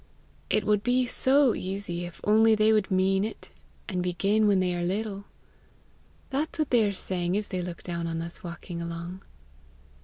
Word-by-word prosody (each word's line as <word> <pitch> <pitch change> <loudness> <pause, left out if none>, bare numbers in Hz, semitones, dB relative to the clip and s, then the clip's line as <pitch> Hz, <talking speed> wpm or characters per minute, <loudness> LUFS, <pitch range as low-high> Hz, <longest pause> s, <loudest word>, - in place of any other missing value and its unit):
It 215 -2 +1
would 210 -1 +3
be 250 +2 +2
so 265 0 +3
easy, 185 -2 -4
if 175 - -10
only 220 +1 +5
they 215 +1 +4
would 215 -3 +2
mean 190 +1 +2
it, 220 - -6 0.4
and 185 -4 -2
begin 200 +4 +2
when 200 -2 +4
they 180 -1 +1
are 175 - -2
little!' 200 +2 -2 1.1
That's 295 +4 -2
what 310 -3 -1
they 240 -3 +5
are 205 - +1
saying 185 -1 -2
as 210 - -3
they 185 -1 -2
look 175 -1 -6
down 170 -1 -3
on 165 0 -3
us 170 +1 -6
walking 170 0 -6
along." 170 +2 -6
195 Hz, 180 wpm, -27 LUFS, 175-215 Hz, 1.1 s, only